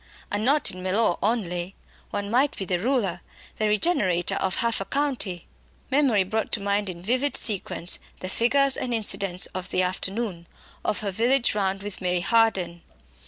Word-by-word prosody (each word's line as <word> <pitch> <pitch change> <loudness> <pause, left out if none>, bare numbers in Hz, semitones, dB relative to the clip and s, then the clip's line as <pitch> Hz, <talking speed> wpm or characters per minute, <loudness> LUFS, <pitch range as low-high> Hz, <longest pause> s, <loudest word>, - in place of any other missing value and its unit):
And 205 +1 -1
not 285 +5 +3
in 185 - -9
Mellor 185 0 +2
only. 190 -5 -1 0.3
One 205 0 -4
might 270 +4 +2
be 195 - -4
the 180 -1 -1
ruler, 200 -6 0 0.4
the 215 - +2
regenerator 210 - +1
of 190 -1 -1
half 230 -3 0
a - - -3
county!" 250 - -1 0.5
Memory 260 -8 +3
brought 220 +4 -2
to - - +2
mind 200 0 -1
in 175 -1 -8
vivid 255 +7 +1
sequence 190 -4 +2 0.2
the 185 - -5
figures 270 +7 +3
and 245 -2 -2
incidents 195 -4 +2
of 185 0 -5
the 185 - +1
afternoon, 190 -1 -2 0.4
of - - -1
her 200 -2 -2
village 240 +6 +2
round 195 -1 -1
with 205 -2 -5
Mary 180 -1 0
Harden. 190 -5 +1
200 Hz, 165 wpm, -25 LUFS, 185-235 Hz, 0.5 s, not